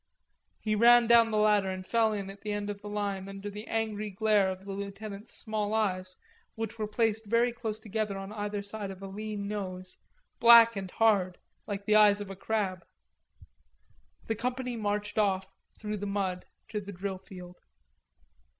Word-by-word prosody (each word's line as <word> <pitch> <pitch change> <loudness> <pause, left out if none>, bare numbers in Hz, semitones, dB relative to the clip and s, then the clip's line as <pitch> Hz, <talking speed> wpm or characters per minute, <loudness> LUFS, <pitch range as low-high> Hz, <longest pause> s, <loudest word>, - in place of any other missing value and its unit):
He 215 - -1
ran 235 +2 +6
down 230 0 +6
the 215 - 0
ladder 210 -2 +3
and 185 0 -5
fell 225 +1 +2
in 200 -2 -4
at 195 - -14
the 210 - -4
end 205 0 -2
of 200 0 -9
the 205 - -7
line 200 -2 -3
under 195 +1 -7
the 210 +2 -8
angry 215 -2 -2
glare 205 -1 +2
of 190 +1 -6
the 200 - -6
lieutenant's 200 +2 -7
small 215 -1 -2
eyes, 185 -4 -1 0.4
which 225 0 -5
were 215 - -1
placed 220 0 0
very 235 +3 +3
close 225 -3 -4
together 215 -2 -3
on 195 +1 -7
either 205 -1 -3
side 205 0 -5
of 195 0 -9
a - - -5
lean 205 +1 -5
nose, 185 -3 -5 0.4
black 230 -1 +8
and 195 -2 -4
hard, 195 -4 +2 0.3
like 200 -1 -4
the 215 - +3
eyes 210 -1 +6
of 205 -1 -6
a - - -7
crab. 195 -3 -2 1.4
The 225 - -1
company 250 +2 -3
marched 210 -1 -2
off 190 -2 +1 0.3
through 210 -1 -3
the 205 +1 -4
mud 195 -2 -2 0.2
to 210 -1 -3
the 200 0 -8
drill 190 0 -4
field. 180 -2 -12
205 Hz, 180 wpm, -29 LUFS, 195-220 Hz, 1.4 s, black